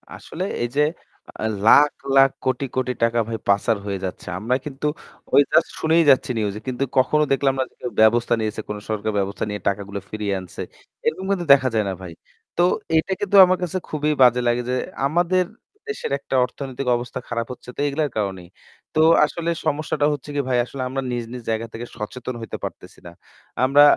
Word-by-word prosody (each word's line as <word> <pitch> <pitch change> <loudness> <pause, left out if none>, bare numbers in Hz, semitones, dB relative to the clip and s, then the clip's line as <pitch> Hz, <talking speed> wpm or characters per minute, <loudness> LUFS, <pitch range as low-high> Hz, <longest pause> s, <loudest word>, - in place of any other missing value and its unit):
আসলে 180 - -6 0.2
এই - - +1
যে 145 - +4 0.6
আ - - 0 0.2
লাখ, 145 +5 +7 0.2
লাখ 135 0 +7 0.2
কোটি, 130 +1 0
কোটি 130 -1 0
টাকা 115 0 +2
ভাই 115 - -3
প্যাঁচার 100 +2 +2
হয়ে 100 -1 -3
যাচ্ছে। 90 - -7
আমরা 115 +5 0
কিন্তু 145 0 -6 0.5
ওই - - +8
just 165 - +4
শুনেই 165 +1 +4
যাচ্ছি 130 -1 +4
news 105 -2 -1
এ। - - -5
কিন্তু 130 +1 -1
কখনো 150 +4 +4
দেখলাম 135 0 +2
না 130 - +3
যে - - -32
কেউ 125 - -4
ব্যবস্থা 120 +2 +4
নিয়েছে, 110 0 -2
কোনো 105 0 -4
সরকার 110 0 -1
ব্যবস্থা 100 0 -2
নিয়ে 105 -2 -4
টাকাগুলা 100 0 -4
ফিরিয়ে 105 -2 -2
আনছে। 95 -1 -9 0.4
এরকম 185 +4 -1
কিন্তু 180 -3 0
দেখা 135 -2 +3
যায় 110 -2 +1
না - - -2
ভাই। 90 -2 -8 0.4
তো 175 - +4 0.3
এটা 160 +4 0
কিন্তু 205 0 0
আমার 185 0 +2
কাছে 180 +1 -2
খুবই 150 0 0
বাজে 125 -1 +6
লাগে 120 +1 +2
যে 125 - +1 0.3
আমাদের 175 +4 +2 0.4
দেশের 430 - -4
একটা 135 - -4
অর্থনৈতিক 135 +1 -6
অবস্থা 120 +1 -6
খারাপ 115 0 -2
হচ্ছে 125 - -14
তো - - -11
এগুলার 145 +1 0
কারণেই। 95 -4 -3 0.5
তো 155 - +4 0.2
আসলে 170 +2 -3 0.2
সমস্যাটা 150 -1 0
হচ্ছে 145 0 -7
কি 145 - +2
ভাই 125 -1 +2
আসলে 130 +1 -7
আমরা 135 +1 -2
নিজ, 120 -1 -2
নিজ 125 -1 -7
জায়গা 110 +1 -2
থেকে 115 +1 -6
সচেতন 125 +4 -5
হইতে 115 - -5
পারতেছি - - -8
না। - - -9 0.5
আমরা 140 +3 +6
125 Hz, 195 wpm, -22 LUFS, 110-145 Hz, 0.6 s, ওই